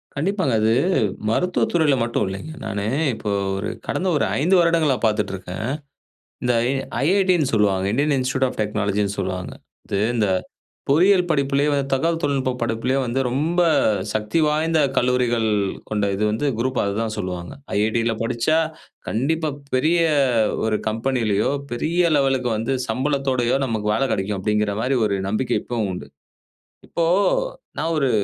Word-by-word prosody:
கண்டிப்பாங்க. 180 - 0
அது 110 +1 +3 0.6
மருத்துவத் 180 +10 +1
துறைல 160 -5 +3
மட்டும் 115 -2 0
இல்லைங்க. 100 +12 -6
நானு 100 -2 -3 0.3
இப்போ 105 -2 -4 0.3
ஒரு 100 - -3 0.2
கடந்த 185 - -1 0.3
5 180 +5 +3
வருடங்களா 165 -5 +3
பாத்துட்ருக்கேன். 95 -3 -2 0.8
இந்த 125 0 +2 0.2
எ - - 0 0.3
"IIT" 190 +3 +3
ன்னு 145 -5 +1
சொல்லுவாங்க. 100 -3 +2
இந்தியன் 145 +4 +2
இன்ஸ்டிடியூட் 130 +1 +1
ஆப் - - -9
டெக்னாலஜின்னு 105 -1 -1
சொல்லுவாங்க. 95 -1 -4 0.3
இது 100 - -2 0.2
இந்த 110 -2 +2 0.6
பொறியியல் 180 +6 +5
படிப்புலேயே 140 -1 +1
தகவல் 165 +5 +1
தொழில்நுட்ப 135 -2 0
படிப்புலேயே 120 +4 0
வந்து 120 +3 -1
ரொம்ப 160 +8 +1 0.5
சக்தி 110 +8 -1
வாய்ந்த 155 +2 +1 0.2
கல்லூரிகள் 125 -2 +2 0.4
கொண்ட 105 -1 0
இது 105 - -2
வந்து 110 +7 -1
குரூப்பா 130 +2 0
அதான் 110 +2 -2
சொல்லுவாங்க. 90 -1 -4 0.2
"IIT" 110 +2 +1
ல - - +1
படிச்சா 120 +7 +1 0.5
கண்டிப்பா 155 +7 0 0.2
பெரிய 155 +7 +3 0.7
ஒரு 110 -1 +1
கம்பெனிலையோ, 115 -2 0 0.2
பெரிய 165 +9 +1
லெவலுக்கு 135 -3 +1
வந்து 120 +5 -1
சம்பளத்தோடயோ 130 -2 0
நமக்கு 110 -4 -1
வேல 135 - +1
கெடைக்கும், 100 0 -2
அப்டிங்கற 105 0 0
மாரி 130 +3 +1
ஒரு 100 -1 -1
நம்பிக்கை 120 +5 0
இப்பவும் 115 -4 -2
உண்டு. - - -7 0.8
இப்போ 170 - -1 0.7
நான் 165 +1 -1
ஒரு 135 -3 +2
125 Hz, 135 wpm, -22 LUFS, 105-150 Hz, 0.8 s, பொறியியல்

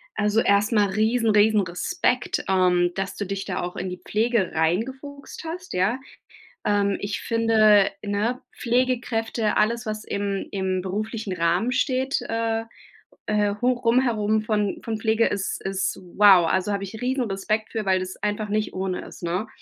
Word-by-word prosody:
Also, 210 +2 +2
erst 200 +3 +3
mal 205 -3 +3
riesen 220 +3 +1
riesen 210 0 +4
Respekt, 240 - -1
ähm, 180 -2 +3
dass 195 0 -3
du 205 - -3
dich 195 +1 -4
da - - -3
auch 180 0 -5
in 185 0 -4
die 180 - -7
Pflege 220 -3 +1
reingefuchst 260 - -2
hast, 360 +3 -6
ja. 195 +8 +1 0.7
Ähm, 200 -1 +2
ich 205 +1 -4
finde, 215 -3 +4
ne, 210 +5 -1
Pflegekräfte, 235 -3 0
alles 230 +3 +1
was 215 0 -4
im 200 -1 -3
im 190 -1 -1
beruflichen 210 +1 -3
Rahmen 175 +7 +1
steht, 260 +1 0
äh, 225 0 -1 0.6
äh, 210 -1 +1
hoch 250 -1 +1
rum 240 +3 +5
herum 215 -3 +1
von 210 -2 -1
von 225 -1 -3
Pflege 220 0 +2
ist 200 -1 -3
ist 195 0 -2 0.2
wow, 190 -5 +7
also, 190 +2 0
habe 200 0 -2
ich 215 +4 -8
Riesen-Respekt 220 -4 -1
für, 220 -3 -3
weil 190 -1 +3
das 185 0 -6
einfach 210 0 -2
nicht 215 +1 -1
ohne 190 -1 -2
ist, - - -12
ne? 180 +6 -2
210 Hz, 160 wpm, -24 LUFS, 195-230 Hz, 0.7 s, wow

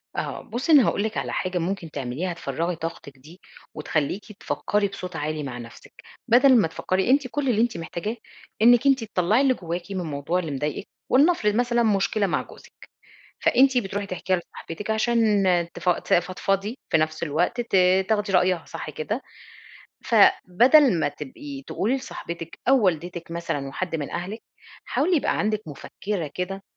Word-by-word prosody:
آه - - -3
بُصّي، 245 +8 -3
أنا 285 -6 +7
هاقول 200 - 0
لِك 220 0 -3
على - - -3
حاجة 185 -1 -2
ممكن 175 -1 -3
تعمليها، 145 +7 -3
تفرغي 170 +2 -3
طاقتِك 160 -4 -7
دي 155 +8 -16 0.3
وتخليكِ 155 +7 -2
تفكري 205 0 -1
بصوت 185 -3 -8
عالي 155 0 -3
مع 130 -3 -5
نفسك، 115 -1 -12 0.3
بدل 255 +2 +6
ما 205 - +3
تفكري، 185 +5 -1
أنتِ 270 0 +3
كل 275 +1 -2
اللي 225 -2 +2
أنتِ 235 -4 0
محتاجاه 175 +7 -4 0.4
إنِك 240 +2 +6
أنتِ 270 -4 +3
تطلّعي 210 +3 +1
اللي 270 -2 +4
جواكِ 175 -1 -6
من 190 - -2
الموضوع 155 +2 -2
اللي 165 -4 -4
مضايقِك، 150 +6 -3 0.2
ولنفرض 260 -7 +3
مثلًا 240 0 +2
مشكلة 205 -1 +1
مع - - 0
جوزِك، - - -16 0.5
فأنتِ 265 0 +4
بتروحي 200 -2 -2
تحكيها 185 0 -1
لصاحبتِك 175 +3 -8
عشان 220 -2 +2 0.3
تف 180 - -1
ت 175 - 0
تفضفضي، 195 +5 0
في - - +4
نفس 155 +1 -1
الوقت 170 +9 0
ت 235 - -3 0.3
تاخدي 210 -2 +1
رأيها، 180 -2 +2
صح 165 -1 -7
كده؟ 155 - -4 0.8
فبدل 245 - +5
ما 145 - +2
تبقي 145 -1 -8
تقولي 235 +7 0
لصاحبتِك 170 -10 -7
أو 265 -4 +5
والدتِك 175 -1 -1
مثلًا 165 -5 -3
وحد 170 +4 -3
من 145 -3 -5
أهلِك، 195 +6 -5 0.4
حاولي 345 +5 +1
يبقى 290 - 0
عندك 215 0 0
مفكّرة 170 +5 -5
كده 195 +2 -4
185 Hz, 160 wpm, -24 LUFS, 165-225 Hz, 0.8 s, أنا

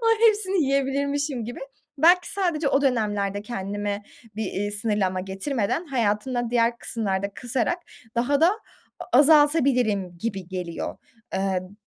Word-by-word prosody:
ay, 455 0 +5
hepsini 390 -5 +1
yiyebilirmişim 275 -1 0
gibi. 240 +2 -7 0.4
Belki 350 +4 +5
sadece 340 -7 0
o 275 +1 +2
dönemlerde 205 -6 0
kendime 205 -1 -4 0.3
bir, 205 -2 -2
ııı, 205 - -2
sınırlama 205 -3 0
getirmeden 200 - -2
hayatımda 240 -1 -1
diğer 235 0 +2
kısımlarda 200 -3 -2
kısarak 250 +7 -1 0.4
daha 275 +4 +2
da 330 - +6 0.5
a 245 - +2
azaltabilirim 270 - +4
gibi 195 -3 -4
geliyor. 180 -3 -5 0.4
Iıı, 190 -1 0
b 205 - -18
235 Hz, 125 wpm, -24 LUFS, 200-280 Hz, 0.5 s, da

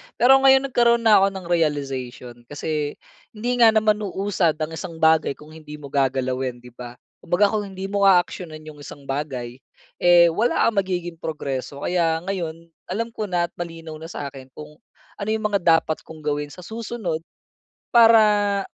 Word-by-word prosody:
Pero 265 +3 +6
ngayon, 270 0 +5
nagkaroon 235 -2 +2
na 215 -3 +6
ako 195 - +4
ng 190 -2 -7
realization. 135 -7 -2
Kasi 145 +1 -3 0.4
hindi 245 +3 -2
nga 225 -2 +6
naman 215 -1 +3
uusad 195 -4 -1
ang 155 0 -4
isang 160 +1 -7
bagay 160 -3 +3
kung 150 +1 -15
hindi 155 -1 -11
mo 145 -2 -11
gagalawin, 130 -2 -1
'di 125 - -13
ba? 120 0 -10 0.3
Kumbaga, 200 +5 +2
kung 210 -1 -2
hindi 190 0 -7
mo 200 -1 +3
aaksiyunan 175 -4 +1
'yong 155 -1 -12
isang 145 0 -11
bagay, 135 -3 -5 0.4
eh, 175 -1 +6
wala 225 +8 +1
kang 220 -3 +1
magiging 175 -3 -4
progreso. 140 -3 -5
Kaya 165 -2 0
ngayon, 170 -3 -5 0.2
alam 230 +5 -3
ko 215 -2 -4
na 175 -2 0
at - - -64
malinaw 165 -2 -7
na 160 - -8
sa 145 -4 -6
akin 130 -1 -12
kung 150 0 -12 0.4
ano 200 - -4
'yong 220 0 -1
mga 210 -1 +1
dapat 165 -2 +2
kong 155 -1 -12
gawin 145 0 -2
sa 180 +5 -12
susunod 220 -7 -4 0.7
para 210 -4 +5
170 Hz, 175 wpm, -22 LUFS, 150-205 Hz, 0.7 s, Pero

